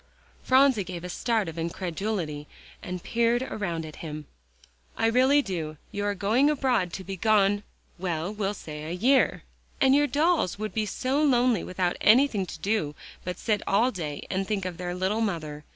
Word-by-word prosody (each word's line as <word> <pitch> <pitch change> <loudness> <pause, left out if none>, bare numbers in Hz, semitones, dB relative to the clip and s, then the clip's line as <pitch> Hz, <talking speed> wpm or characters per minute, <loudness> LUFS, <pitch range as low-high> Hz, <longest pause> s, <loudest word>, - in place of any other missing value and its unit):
Phronsie 260 -4 +4
gave 175 -1 -7
a 180 - -5
start 225 0 0
of 165 0 -6
incredulity 170 -2 -3 0.3
and 180 -1 -6
peered 235 +1 +1
around 175 -10 -3
at 155 - -10
him. 155 -2 -7 0.7
"I 225 - +1
really 260 +5 +4
do. 160 -7 -4
You 205 0 -3
are 205 0 0
going 225 +9 +3
abroad 255 - +1
to 190 - -5
be 195 +1 -5
gone 205 0 +3 0.4
well, 175 +1 -2
we'll 205 -1 -2
say 150 -4 -8
a - - -5
year. 245 +10 +2 0.4
And 265 0 +5
your 290 +1 +4
dolls 305 - +1
would 215 +1 -4
be 215 -1 -1
so 265 +7 0
lonely 250 - +3
without 180 -1 -1
anything 220 -4 +4
to - - -7
do 195 -8 -1 0.3
but 180 0 -4
to - - -13
sit 210 -3 +1
all 225 +6 +3
day 155 - -5
and 190 0 -1
think 205 -3 -1
of 180 -2 -4
their 180 0 -4
little 190 +5 0
mother. 155 -8 -3
200 Hz, 185 wpm, -27 LUFS, 175-235 Hz, 0.7 s, And